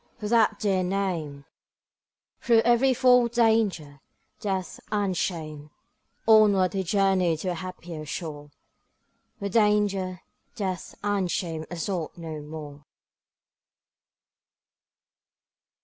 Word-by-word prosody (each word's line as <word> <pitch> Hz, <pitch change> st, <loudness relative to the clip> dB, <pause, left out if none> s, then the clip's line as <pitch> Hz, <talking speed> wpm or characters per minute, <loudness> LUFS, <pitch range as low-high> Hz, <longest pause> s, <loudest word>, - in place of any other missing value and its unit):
for 210 Hz, -, -5 dB
that 220 Hz, -2 st, +3 dB
dear 195 Hz, -3 st, +1 dB
name, 180 Hz, -7 st, -2 dB, 1.0 s
Through 230 Hz, -2 st, +4 dB
every 240 Hz, +3 st, +4 dB
form 250 Hz, -1 st, +5 dB
of 235 Hz, -, -15 dB
danger, 210 Hz, -, +1 dB, 0.4 s
death, 190 Hz, -4 st, -3 dB
and 200 Hz, -3 st, 0 dB
shame, 155 Hz, -4 st, -4 dB, 0.6 s
Onward 205 Hz, -5 st, +5 dB
he 195 Hz, -, 0 dB
journeyed 190 Hz, -3 st, +2 dB
to 185 Hz, -, -2 dB
a -, -, 0 dB
happier 175 Hz, -2 st, -7 dB
shore, 150 Hz, -1 st, -6 dB, 0.9 s
Where 200 Hz, -, -4 dB
danger, 205 Hz, -4 st, +1 dB, 0.3 s
death, 190 Hz, -5 st, -4 dB
and 200 Hz, -3 st, 0 dB
shame 165 Hz, -3 st, -3 dB
assault 175 Hz, -1 st, -4 dB
no 160 Hz, -3 st, -6 dB
more. 150 Hz, -1 st, -9 dB
185 Hz, 100 wpm, -26 LUFS, 165-210 Hz, 1.0 s, form